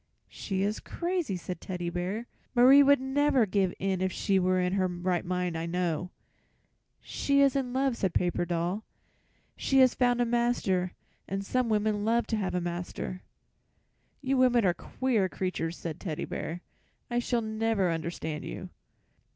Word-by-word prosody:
"She 195 -2 -3
is 210 +2 -1
crazy," 345 - -2
said 180 0 -6
Teddy 175 -2 -4
Bear. 185 +6 -3 0.3
"Marie 260 +4 +8
would 285 0 +6
never 265 -1 +2
give 190 -2 +1
in 190 -1 -1
if 190 0 +1
she 195 0 +1
were 185 0 +2
in 180 0 0
her 190 -1 +2
right 180 0 -1
mind, 180 -1 -2
I 165 +1 -3
know." 175 0 -1 0.9
"She 280 0 0
is 275 -1 +4
in 260 -3 -1
love," 265 0 +1
said 190 -5 0
Paper 175 -1 +1
Doll. 175 +4 -2 0.7
"She 270 - 0
has 260 -2 +6
found 245 -1 +2
a 245 - +3
master, 230 -7 +1 0.3
and 195 +1 -3
some 250 +2 0
women 210 -1 +1
love 230 +2 +2
to - - +2
have 190 -3 -2
a - - +2
master." 175 +1 -4 1.0
"You 270 0 +1
women 245 -3 +4
are 180 - +4
queer 225 -2 -1
creatures," 175 -3 -3
said 165 -1 -6
Teddy 160 -6 -4
Bear. 170 +2 -5 0.5
"I 240 - +2
shall 240 0 0
never 220 -4 0
understand 165 -2 -4
you." - - -6
195 Hz, 165 wpm, -29 LUFS, 180-245 Hz, 1.0 s, Marie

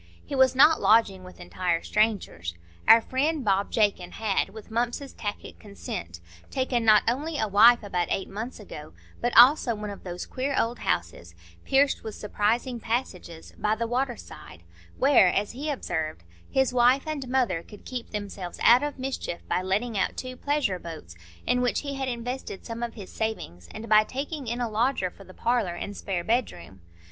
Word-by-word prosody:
He - - -8
was 265 -1 +4
not 300 +4 +6
lodging 210 -4 +3
with 185 0 -13
entire 175 -1 -2
strangers. 200 - -1 0.3
Our 230 - +9
friend 280 +3 -1
Bob 195 0 +1
Jakin 200 -5 +1
had, 210 -3 0
with 220 +2 -12
Mumps's 240 +4 -2
tacit 205 -1 -6
consent, 85 - -7 0.3
taken 255 -3 -1
not 215 -2 +6
only 295 +7 -1
a 220 - 0
wife 225 +4 +6
about 180 -4 -1
eight 195 - -1
months 225 +5 -6
ago, 155 -7 -10 0.3
but 240 - +1
also 245 -1 +7
one 210 -1 -5
of 200 - -10
those 180 -1 -6
queer 270 +2 -3
old 235 +2 -1
houses, 85 0 -3 0.3
pierced 275 +1 +2
with 220 - -6
surprising 230 +4 -1
passages, 195 -8 -4
by 215 +1 +1
the 230 +1 -2
water 245 +1 -1
side, 85 - -12 0.3
where, 265 -8 +5
as 200 +3 0
he 285 +6 -5
observed, 160 - -3 0.3
his 265 -1 +1
wife 250 +2 +4
and 300 -4 -4
mother 245 -10 +1
could 205 +4 -15
keep 250 -2 -6
themselves 200 -4 -6
out 240 +2 +7
of 290 0 -3
mischief 260 -9 -5
by 180 - 0
letting 200 +4 -1
out 185 - -1
two 255 0 -5
"pleasure 285 -9 -1
boats," 155 - -9 0.3
in 250 - +2
which 245 - +1
he 280 -1 -5
had 270 -1 -3
invested 245 -3 -5
some 230 0 -6
of 235 -1 -4
his 200 -5 -9
savings, 90 - -4
and 225 +1 -8
by 215 0 +6
taking 275 +3 -5
in 235 +2 -2
a 240 - 0
lodger 220 -4 0
for 195 - -15
the - - -13
parlour 225 -4 0
and 205 +3 -6
spare 185 -4 -3
bedroom. 170 - -2
225 Hz, 180 wpm, -26 LUFS, 190-255 Hz, 0.3 s, Our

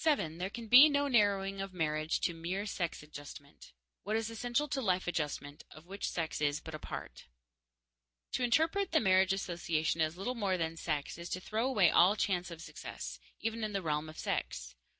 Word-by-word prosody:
There 185 - +1
can 230 +2 -7
be 260 +7 +10
no 285 0 +2
narrowing 200 -5 +2
of 195 -1 -6
marriage 155 -1 0
to 170 - +1
mere 175 +5 -3
sex 170 -7 -3
adjustment. 145 -1 -11 0.3
What 215 +3 -2
is 225 0 -1
essential 245 +5 -1
is - - -2
life 185 -8 +1
adjustment, 150 -4 -3
of 155 +2 -14
which 195 +2 -4
sex 160 -3 -3
is 145 0 +1
but 160 - -9
a 155 - -5
part._ - - -7 1.1
To 255 - -1
interpret 325 +10 +2
the 320 - +6
marriage 190 -2 +4
association 170 -4 -1
as 160 +2 0
little 235 +7 -2
more 200 -6 0
than 165 -1 -2
sex 150 -1 -3
is 170 0 -6
to 185 - -2
throw 220 +6 -1
away 205 -10 +4
all 185 +4 +6
chance 180 -4 0
of 165 -1 -8
success, - - -7 0.2
even 225 +1 -2
in 215 -1 -2
the 195 -2 -1
realm 150 0 -1
of 155 - -11
sex. - - -3
185 Hz, 190 wpm, -33 LUFS, 160-220 Hz, 1.1 s, be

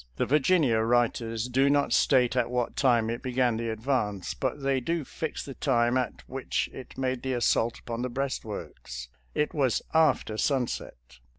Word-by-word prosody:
The - - 0
Virginia 145 -4 +3
writers 115 0 +1
do 135 +3 +3
not 145 0 +2
state 125 -2 +3
at 125 -2 +1
what 125 -1 -1
time 120 -4 +3
it 120 - -4
began 125 -3 +1
the 115 0 -2
advance, 110 -4 -1
but 135 +2 -3
they 135 -1 +2
do 165 +4 -2
fix 160 +2 -5
the 135 - -7
time 120 -3 +1
at 130 -2 -2
which 130 0 -2
it 130 - -10
made 130 -1 -1
the 130 -1 -2
assault 120 -1 +1
upon 115 0 -5
the 125 - -2
breastworks 105 - -5
— - - -36
it 150 - 0
was 135 -6 +1
after 160 -9 +3
sunset. 115 - -2
125 Hz, 175 wpm, -28 LUFS, 115-135 Hz, -, Virginia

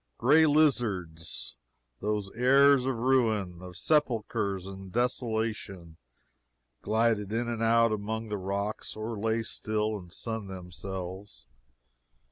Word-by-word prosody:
Gray 150 +6 +5
lizards, 105 - 0 0.4
those 105 -1 -2
heirs 135 +2 +5
of 135 - 0
ruin, 110 -8 +1
of 90 -1 -9
sepulchres 110 - 0
and 95 -1 -9
desolation, 110 -7 -2 0.8
glided 110 -1 +1
in 115 +2 -1
and 115 -1 -3
out 115 0 +4
among 110 +1 -3
the 105 - -2
rocks 100 +3 -3
or 110 +2 -4
lay 110 +1 0
still 110 -1 -1
and 90 -2 -13
sunned 110 +1 -4
themselves. 95 +1 -7
110 Hz, 110 wpm, -29 LUFS, 95-115 Hz, 0.8 s, Gray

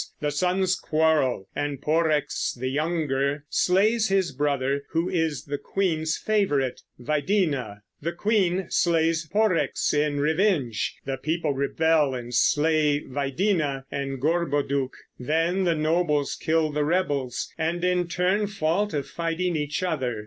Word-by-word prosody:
The 150 -1 -1
sons 185 +4 +1
quarrel, 155 - +1
and 145 -2 -2
Porrex, 155 0 0
the 130 +1 -1
younger, 145 -1 -1
slays 215 +5 +2
his 195 -2 +1
brother, 140 0 0
who 165 +2 +1
is 160 -5 -1
the 145 0 -4
queen's 160 -5 -1
favorite. 145 - 0 0.2
Videna, 145 - -1 0.2
the 165 +3 -2
queen, 190 -1 +1
slays 165 -1 +2
Porrex 210 -4 +1
in 145 -1 +1
revenge; 155 - +1
the 135 0 -2
people 155 +1 -1
rebel 145 +1 +1
and 120 -1 -6
slay 150 +3 +3
Videna 140 +1 -1
and 135 -1 -3
Gorboduc; 145 -3 0 0.3
then 165 +8 0
the 170 -2 +2
nobles 155 -2 +1
kill 160 -1 +1
the 150 0 0
rebels, 145 -7 -1
and 165 +2 -2
in 180 -1 +1
turn 185 +4 +1
fall 200 0 0
to 150 -7 -2
fighting 170 +3 -2
each 150 +3 -2
other. 130 -10 -1
155 Hz, 130 wpm, -25 LUFS, 140-175 Hz, 0.3 s, slay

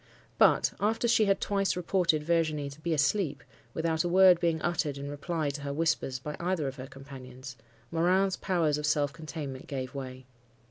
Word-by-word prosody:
But, - - +4
after 225 +3 +1
she 225 -2 +4
had 195 -1 +2
twice 195 -2 0
reported 175 -3 +1
Virginie 155 -3 0
to 145 +3 -13
be 170 - -2
asleep, 150 0 +1 0.3
without 160 0 0
a 175 - -1
word 185 -1 +6
being 165 -2 +1
uttered 160 -5 -1
in 140 +1 -6
reply 150 0 -2
to 145 +1 -7
her 140 0 -4
whispers 155 -3 0
by 150 +4 -6
either 170 -4 -1
of 135 +1 -6
her 130 0 -7
companions, 135 -1 -10 0.4
Morin's 185 +3 +2
powers 160 -5 0
of 150 - -2
self 145 -2 +1
containment 150 -5 -7
gave 130 -2 -5
way. 130 -2 -7
155 Hz, 180 wpm, -29 LUFS, 140-175 Hz, 0.4 s, word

